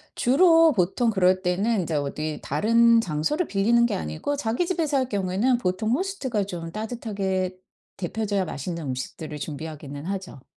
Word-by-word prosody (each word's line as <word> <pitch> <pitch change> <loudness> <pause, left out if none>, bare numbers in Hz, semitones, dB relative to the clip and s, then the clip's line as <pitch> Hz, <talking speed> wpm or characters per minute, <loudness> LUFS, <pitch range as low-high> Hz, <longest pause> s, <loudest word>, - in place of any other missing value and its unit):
주로 325 +4 +5
보통 200 +5 +1
그럴 185 -2 +3
때는 195 +3 +1
이제 165 -2 -3
어디 150 +2 -3
다른 230 +9 +4
장소를 180 - -1
빌리는 235 +4 +3
게 235 - 0
아니고 80 - -3
자기 245 +4 -1
집에서 315 -6 0
할 260 -1 +1
경우에는 205 +5 +1
보통 215 +1 -1
호스트가 270 - -1
좀 170 -4 -6
따뜻하게 200 -5 -2 0.4
덥혀져야 200 +1 -1
맛있는 165 +3 -5
음식들을 150 +4 -5
준비하기는 145 -1 -7
하죠. 185 -8 -5
195 Hz, 355 characters per minute, -25 LUFS, 165-235 Hz, 0.4 s, 주로